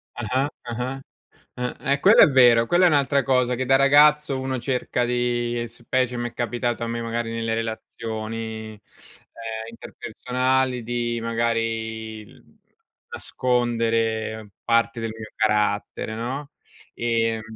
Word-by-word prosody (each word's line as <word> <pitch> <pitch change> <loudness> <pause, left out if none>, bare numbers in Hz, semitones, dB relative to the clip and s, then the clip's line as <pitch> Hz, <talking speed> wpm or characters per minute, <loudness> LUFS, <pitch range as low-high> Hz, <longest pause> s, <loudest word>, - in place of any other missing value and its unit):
Ah-ah. 125 +4 0 0.2
Ah-ah, 125 +3 -4 0.6
uhm, 125 0 -3
ehm, 140 +1 0
quello 205 +7 +7
è - - +9
vero, 120 -4 +6
quella 175 +5 +3
è - - +7
un'altra 140 -2 +2
cosa 125 -2 +2
che 130 +2 -2
da 135 +1 +4
ragazzo 145 +1 +5
uno 130 -1 -2
cerca 125 -1 -1
di 120 -1 -1
specie 125 +2 -1
m'è 120 -1 -4
capitato 120 0 -2
a - - -3
me, 115 0 -3
magari 115 0 -3
nelle 115 0 -2
relazioni, 110 0 -5
ehm, 105 - -19 0.9
interpersonali 125 +2 -2
di 120 0 -2
magari, 115 -1 -2
uhm, - - -21 0.5
nascondere 115 -3 -1
parte 115 0 +1
del 115 -1 -3
mio 110 -1 -9
carattere, 105 0 0
no? 130 +6 -4 0.4
Ehm, 115 -1 0
120 Hz, 125 wpm, -23 LUFS, 115-130 Hz, 0.9 s, è